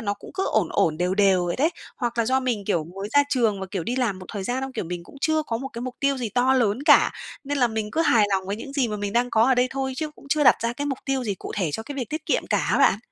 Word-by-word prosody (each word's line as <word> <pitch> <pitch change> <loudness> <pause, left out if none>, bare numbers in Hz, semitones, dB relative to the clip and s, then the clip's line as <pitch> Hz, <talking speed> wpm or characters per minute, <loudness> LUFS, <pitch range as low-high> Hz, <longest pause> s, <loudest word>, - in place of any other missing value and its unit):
nó 205 -2 -1
cũng - - -13
cứ 380 0 -1
ổn 205 -7 +2
ổn, 155 -2 +1
đều 180 +3 0
đều 195 -3 +3
vậy 175 - -2
đấy, 310 +6 +2 0.3
hoặc 240 -2 -3
là 230 - +3
do 260 +2 +2
mình, 240 -6 -2
kiểu, 170 -6 0
mới 195 +5 -7
ra 285 - +6
trường 225 -7 +1
và, 190 - -4
kiểu, 185 -5 -3
đi 245 - -2
làm 230 -7 0
một 185 - -10
thời 200 -3 -4
gian 250 +5 -2
xong, 265 0 -5
kiểu, - - -3
mình 170 0 -6
cũng 280 - -15
chưa 315 -1 +2
có 230 -6 -3
một 270 +3 -5
cái 235 -2 -7
mục 255 0 -5
tiêu 275 0 +2
gì 240 -3 -2
to 250 +4 +2
lớn 240 -1 +1
cả, 295 - +6 0.3
nên 285 +1 -2
là 250 - +4
mình 220 -2 -3
cứ 320 - 0
hài 235 -9 +4
lòng 190 -1 0
với 200 +2 -2
những 270 +4 -8
gì 275 -4 +1
mà 210 - -3
mình 205 -1 -3
đang 245 +2 +1
có 220 - +3
ở 260 +2 +4
đây 250 0 +3
thôi 265 -1 -2
chứ 310 +1 -3
cũng - - -16
chưa 300 +1 +2
đặt - - +7
ra 230 +1 -1
cái 285 +4 -4
mục 270 -2 -2
tiêu 270 -2 -1
gì 205 -3 -1
cụ - - -8
thể 180 -7 0
cho 220 - -3
cái 285 +6 -8
việc 255 -5 -4
tiết 310 0 -5
kiệm - - 0
cả - - +1
á - - +3
bạn. - - +4
235 Hz, 335 wpm, -24 LUFS, 200-265 Hz, 0.3 s, đặt